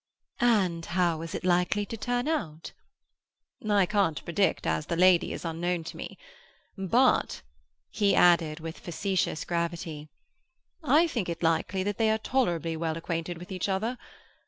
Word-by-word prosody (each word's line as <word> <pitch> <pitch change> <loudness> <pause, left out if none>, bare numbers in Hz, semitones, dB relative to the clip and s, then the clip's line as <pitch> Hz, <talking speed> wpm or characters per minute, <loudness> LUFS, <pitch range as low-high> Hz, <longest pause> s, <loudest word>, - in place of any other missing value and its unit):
"And 195 -9 +2
how 170 -2 0
is 165 - -6
it - - -5
likely 180 +3 +2
to 225 - -6
turn 245 +3 -2
out?" 165 - -3 1.0
"I 200 -2 +4
can't 195 -6 0
predict, 170 +1 0
as 80 -1 -1
the - - -1
lady 180 0 +4
is - - -6
unknown 170 +1 -2
to 160 - -8
me. - - -7 0.6
But," 230 +7 +2 0.5
he 205 -2 +2
added 170 -3 +4
with 165 +1 -7
facetious 185 -1 -2
gravity, 170 -3 -3 0.7
"I 300 +4 +5
think 235 - -2
it 170 0 -5
likely 165 +3 +1
that 205 0 -3
they 220 -1 +3
are 220 - +2
tolerably 175 - 0
well 160 0 -2
acquainted 165 0 -4
with 180 +3 -11
each 185 +1 -2
other. 220 +6 -1
180 Hz, 155 wpm, -28 LUFS, 165-205 Hz, 1.0 s, I